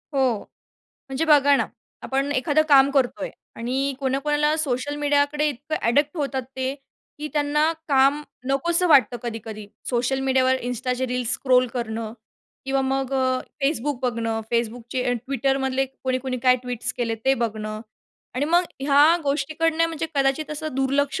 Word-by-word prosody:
हो. 255 -5 +2 0.7
म्हणजे 270 +4 -1
बघा 285 -2 +5
ना, - - 0 0.4
आपण 275 +1 -1
एखादं 290 +3 +2
काम 275 -1 +6
करतोय 275 +1 0 0.3
आणि 265 +4 -1
कोणाकोणाला 295 +3 +1
सोशल 290 -1 -1
मीडियाकडे 290 +1 +1
इतकं 295 +3 -4
ॲडिक्ट 290 +7 +2
होतात 275 -3 -2
ते, 260 +1 -1 0.4
की 300 +1 -4
त्यांना 300 +1 +2 0.2
काम 275 +1 +4 0.3
नकोसं 340 +6 +1
वाटतं 265 -5 +5
कधी-कधी. 225 -3 -6 0.2
सोशल 250 +2 0
मीडियावर 260 0 +3
Instaचे 250 +1 -2
रील्स 250 -1 -1
स्क्रॉल 255 -1 +3
करणं 225 -2 -3 0.5
किंवा 270 0 0
मग 270 0 -1
अ, 260 -1 +1 0.2
Facebook 285 -1 0
बघणं, 230 -2 -1
Facebookचे 235 +2 -1 0.2
Twitterमधले 270 0 0
कोणी-कोणी 260 -1 -3
काय 255 -1 +5
ट्वीट्स 245 -2 -3
केलेत, 230 -2 -2
ते 270 - +4
बघणं. 215 -3 -3 0.5
आणि 260 +3 0
मग 345 +4 +3 0.2
ह्या 290 +4 +5
गोष्टीकडनं 315 +3 +1
म्हणजे 325 -1 -3
कदाचित 275 +2 +1
असं 310 +1 -4
दुर्लक्ष 275 +1 0
270 Hz, 140 wpm, -23 LUFS, 250-290 Hz, 0.7 s, काम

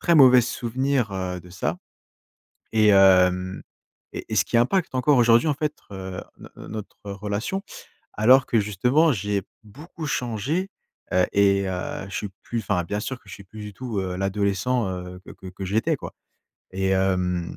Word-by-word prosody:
très 170 - +3
mauvais 130 -3 +8
souvenirs, 125 0 -1
heu, 90 -1 -3
de 90 - -15
ça 90 -2 -3 0.9
et 110 -1 +4
hem 95 -1 +4 0.5
et - - -6
et - - -2
ce - - +4
qui - - -3
impacte 130 +5 +1
encore 130 +2 +3
aujourd'hui 120 +3 +5
en - - +2
fait, 150 +1 -4
heu, 95 -1 -6 0.2
no - - -12 0.2
notre 105 -2 -7 0.2
relation. 105 - -3 0.5
Alors 125 +4 +5
que 115 - +2
justement 125 - +2
j'ai 105 -3 -1 0.2
beaucoup 150 - -9
changé, 135 - -2 0.4
heu 90 0 +4
et 100 -1 +3
heu, 95 +1 -4
je - - -8
suis 105 - -3
plus, 120 - -4
enfin, 100 -4 0
bien 105 +4 -3
sûr 130 +4 -4
que 105 - -23
je 90 - -8
suis 100 - -13
plus 105 +3 -12
du 105 0 -7
tout, 120 -6 -4
heu, 90 -1 -3
l'adolescent, 100 +4 0
heu, 90 0 -7
que - - -12
que 95 - -14
que 95 +1 -7
j'étais 105 +4 +1
quoi - - -8 0.6
et 95 0 -1
hem 90 -2 0
105 Hz, 180 wpm, -24 LUFS, 95-125 Hz, 0.9 s, mauvais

